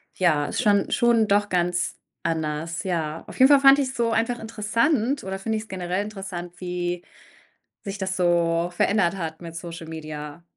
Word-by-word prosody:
ja, 155 Hz, -6 st, +2 dB
ist -, -, -2 dB
schon 205 Hz, -2 st, +3 dB
schon 235 Hz, -2 st, +3 dB
doch 205 Hz, 0 st, +2 dB
ganz 175 Hz, 0 st, 0 dB, 0.3 s
anders, 160 Hz, +1 st, -2 dB
ja. 165 Hz, -4 st, -2 dB
Auf -, -, -10 dB
jeden 260 Hz, +2 st, +8 dB
Fall 285 Hz, -1 st, +7 dB
fand 275 Hz, 0 st, +8 dB
ich‘s 260 Hz, -1 st, -1 dB
so 235 Hz, -1 st, +1 dB
einfach 230 Hz, +2 st, 0 dB
interessant 230 Hz, +5 st, 0 dB
oder 190 Hz, 0 st, -4 dB
finde 220 Hz, +2 st, -1 dB
ich‘s 215 Hz, 0 st, -6 dB
generell 185 Hz, +1 st, -2 dB
interessant, 190 Hz, -4 st, -7 dB
wie 175 Hz, -1 st, -3 dB, 0.8 s
sich 195 Hz, 0 st, -5 dB
das 190 Hz, 0 st, -2 dB
so 170 Hz, -1 st, +2 dB
verändert 195 Hz, -1 st, +2 dB
hat 160 Hz, 0 st, -5 dB
mit 165 Hz, -1 st, -8 dB
Social 165 Hz, -1 st, -7 dB
Media. 155 Hz, 0 st, -7 dB
180 Hz, 170 wpm, -24 LUFS, 170-215 Hz, 0.8 s, jeden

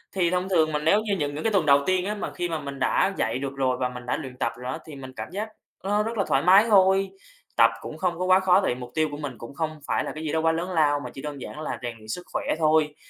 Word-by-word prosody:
Thì 175 Hz, -3 st, +2 dB
thông 180 Hz, +1 st, -1 dB
thường 160 Hz, -4 st, +3 dB
mà 150 Hz, -, 0 dB
nếu 165 Hz, +8 st, +3 dB
như 210 Hz, -2 st, -1 dB
những 145 Hz, -3 st, -2 dB
những 150 Hz, -, -4 dB
cái 225 Hz, -2 st, +1 dB
tuần 180 Hz, -6 st, +3 dB
đầu 140 Hz, 0 st, +5 dB
tiên 185 Hz, -1 st, +1 dB
á, 210 Hz, +2 st, -2 dB
mà -, -, -4 dB
khi 175 Hz, 0 st, -3 dB
mà 160 Hz, -2 st, -2 dB
mình 140 Hz, -1 st, -7 dB
đã 195 Hz, -, +2 dB
dậy 115 Hz, +3 st, 0 dB
được 140 Hz, 0 st, -4 dB
rồi 130 Hz, -2 st, +1 dB
và 125 Hz, -1 st, 0 dB
mình 125 Hz, -1 st, -9 dB
đã 125 Hz, -, -1 dB
luyện 125 Hz, -2 st, -8 dB
tập 115 Hz, -3 st, 0 dB
rồi 125 Hz, +1 st, -5 dB
á, 160 Hz, -, -4 dB
thì 155 Hz, -, -9 dB
mình 130 Hz, -1 st, -9 dB
cảm -, -, -6 dB
giác 205 Hz, +3 st, -3 dB, 0.4 s
rất, 195 Hz, -, -3 dB, 0.2 s
ơ, 225 Hz, -, -2 dB
là 195 Hz, -, +2 dB
thoải 135 Hz, -, +2 dB
mái 195 Hz, +5 st, +7 dB
thôi. 195 Hz, -1 st, +5 dB, 0.5 s
Tập -, -, +7 dB
cũng -, -, -7 dB
không 175 Hz, -3 st, -1 dB
có 185 Hz, -, 0 dB
quá 185 Hz, 0 st, +5 dB
khó, 190 Hz, 0 st, +4 dB
tại 190 Hz, -, +1 dB
vì 125 Hz, -, -8 dB
mục 125 Hz, -, -8 dB
tiêu 155 Hz, -1 st, +2 dB
của 145 Hz, -, -5 dB
mình 140 Hz, -6 st, -6 dB
cũng 120 Hz, +4 st, -10 dB
không 155 Hz, +1 st, -3 dB
phải -, -, +1 dB
là -, -, -4 dB
cái 155 Hz, -, -6 dB
gì 155 Hz, -, -2 dB
đó 160 Hz, -, +2 dB
quá 165 Hz, 0 st, +3 dB
lớn 170 Hz, +3 st, -3 dB
lao 150 Hz, -4 st, +3 dB
mà -, -, -6 dB
chỉ 135 Hz, -, -8 dB
đơn 145 Hz, -2 st, -6 dB
giản 150 Hz, -, -7 dB
là 155 Hz, -, -4 dB
rèn 120 Hz, -2 st, -4 dB
luyện 110 Hz, -1 st, -16 dB
sức 145 Hz, +11 st, -4 dB
khỏe -, -, -1 dB, 0.2 s
thôi. 155 Hz, -1 st, +3 dB
155 Hz, 320 wpm, -25 LUFS, 140-185 Hz, 0.5 s, mái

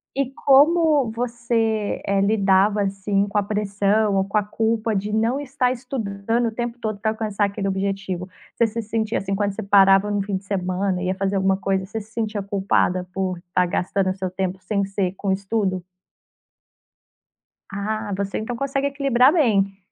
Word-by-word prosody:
E 275 Hz, -1 st, 0 dB
como 290 Hz, -1 st, +4 dB
você, 230 Hz, -2 st, -1 dB
eh, 200 Hz, 0 st, +1 dB
lidava 200 Hz, 0 st, +3 dB
assim 195 Hz, +1 st, 0 dB
com 205 Hz, -, -12 dB
a -, -, +2 dB
pressão 205 Hz, 0 st, +1 dB
ou 195 Hz, -, +3 dB
com 200 Hz, +2 st, -2 dB
a 210 Hz, -, +2 dB
culpa 220 Hz, +1 st, -1 dB
de 205 Hz, +2 st, -2 dB
não 225 Hz, +5 st, +1 dB
estar 270 Hz, -2 st, 0 dB
estudando 230 Hz, -2 st, -2 dB
o -, -, -8 dB
tempo 240 Hz, +1 st, -4 dB
todo 215 Hz, -3 st, -3 dB
para 220 Hz, -, 0 dB
alcançar 215 Hz, -2 st, -1 dB
aquele 200 Hz, 0 st, -3 dB
objetivo? 195 Hz, -1 st, -2 dB, 0.3 s
Você 235 Hz, -, +3 dB
se 230 Hz, +1 st, -4 dB
sentia 220 Hz, +1 st, -1 dB
assim, 195 Hz, 0 st, -3 dB
quando 200 Hz, 0 st, 0 dB
você 220 Hz, -, -5 dB
parava 195 Hz, 0 st, +5 dB
no 205 Hz, -, 0 dB
fim 195 Hz, -1 st, -2 dB
de 190 Hz, -, -11 dB
semana 185 Hz, -1 st, -1 dB
e 185 Hz, -, -2 dB
ia 185 Hz, -, 0 dB
fazer 195 Hz, +1 st, -1 dB
alguma 190 Hz, 0 st, +2 dB
coisa, 195 Hz, -1 st, -1 dB
você 210 Hz, +4 st, -5 dB
se 215 Hz, +1 st, -13 dB
sentia 215 Hz, -3 st, -3 dB
culpada 190 Hz, -2 st, 0 dB
por 185 Hz, -1 st, -2 dB
estar 180 Hz, +1 st, 0 dB
gastando 185 Hz, +2 st, 0 dB
o -, -, -2 dB
seu 185 Hz, -1 st, -4 dB
tempo 185 Hz, 0 st, -3 dB
sem 200 Hz, -2 st, -1 dB
ser 195 Hz, -2 st, -2 dB
com 195 Hz, -2 st, -1 dB
estudo? 195 Hz, -1 st, -1 dB, 1.9 s
Ah, 205 Hz, +1 st, -3 dB
você 200 Hz, 0 st, -3 dB
então 235 Hz, +2 st, -4 dB
consegue 275 Hz, +2 st, -1 dB
equilibrar 275 Hz, -2 st, +3 dB
bem. 200 Hz, -, +2 dB
205 Hz, 180 wpm, -22 LUFS, 195-225 Hz, 1.9 s, parava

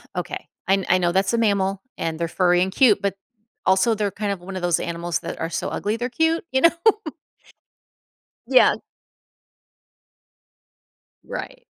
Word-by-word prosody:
okay, -, -, -5 dB, 0.2 s
I 195 Hz, -, +5 dB
kn 195 Hz, -, -4 dB
I 185 Hz, -, +5 dB
know 175 Hz, -1 st, +1 dB
that's 190 Hz, +3 st, +1 dB
a -, -, +2 dB
mammal 200 Hz, -3 st, +1 dB, 0.2 s
and 160 Hz, 0 st, -3 dB
they're 170 Hz, -, -1 dB
furry 180 Hz, 0 st, +2 dB
and 190 Hz, +1 st, 0 dB
cute, 245 Hz, -7 st, +4 dB
but 200 Hz, -1 st, -1 dB, 0.5 s
also 190 Hz, +5 st, +3 dB
they're 205 Hz, -1 st, -1 dB
kind 205 Hz, +1 st, -3 dB
of 195 Hz, -, -3 dB
one 190 Hz, +1 st, -8 dB
of 185 Hz, -, -4 dB
those 175 Hz, -1 st, +1 dB
animals 170 Hz, 0 st, -3 dB
that -, -, -7 dB
are 165 Hz, -, -2 dB
so -, -, -3 dB
ugly 210 Hz, +3 st, -2 dB
they're 245 Hz, +2 st, -3 dB
cute, 320 Hz, +6 st, 0 dB
you 265 Hz, -, +2 dB
know? 335 Hz, -, +7 dB, 1.8 s
Yeah. -, -, +5 dB, 2.5 s
Right. -, -, -7 dB
195 Hz, 165 wpm, -22 LUFS, 175-225 Hz, 2.5 s, know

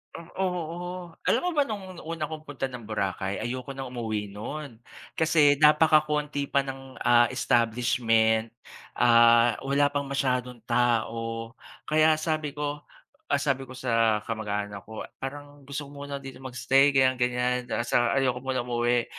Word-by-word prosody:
Hmm, 170 Hz, -, -8 dB, 0.2 s
oo. 175 Hz, -1 st, -4 dB
Alam -, -, +2 dB
mo -, -, +2 dB
ba, 295 Hz, -, +3 dB
no'ng 205 Hz, -3 st, -4 dB
un 175 Hz, -, -11 dB
una 165 Hz, -1 st, -4 dB
kong 155 Hz, 0 st, -7 dB
punta 140 Hz, -3 st, -5 dB
ng 125 Hz, -2 st, -7 dB
Boracay, 100 Hz, -2 st, -3 dB
ayoko 130 Hz, +2 st, -5 dB
nang 135 Hz, -2 st, -6 dB
umuwi 110 Hz, -4 st, -3 dB
no'n. 120 Hz, +2 st, -7 dB, 0.3 s
Kasi, 155 Hz, -3 st, +4 dB
napakakonti 150 Hz, -2 st, +3 dB
pa 140 Hz, 0 st, +1 dB
ng, 135 Hz, -1 st, -8 dB
ah, 120 Hz, 0 st, +4 dB
establishment, 115 Hz, -2 st, +2 dB, 0.5 s
ah, 115 Hz, 0 st, +6 dB
wala 140 Hz, +1 st, +2 dB
pang 140 Hz, -1 st, -2 dB
masyadong 125 Hz, -4 st, -2 dB
tao. 115 Hz, -1 st, 0 dB, 0.3 s
Kaya 155 Hz, 0 st, +4 dB
sabi 155 Hz, -2 st, -2 dB
ko, 145 Hz, 0 st, -3 dB, 0.5 s
ah, -, -, +3 dB
sabi 135 Hz, -3 st, -1 dB
ko 130 Hz, -, -9 dB
sa 115 Hz, -3 st, +2 dB
kamag-anak 105 Hz, -2 st, -4 dB
ko, 110 Hz, 0 st, -8 dB, 0.2 s
"Parang 145 Hz, +1 st, -7 dB
gusto 140 Hz, +1 st, -6 dB
ko 140 Hz, -, -14 dB
muna 140 Hz, 0 st, -6 dB
dito 135 Hz, -1 st, -10 dB
mag-stay", 130 Hz, +2 st, +3 dB
ganyan-ganyan, 125 Hz, -2 st, +1 dB
tas, 120 Hz, 0 st, -2 dB
ah, 120 Hz, +2 st, +3 dB
ayoko 125 Hz, -2 st, +1 dB
muna 130 Hz, -2 st, -2 dB
umuwi. 120 Hz, 0 st, +1 dB
130 Hz, 150 wpm, -27 LUFS, 120-145 Hz, 0.5 s, ah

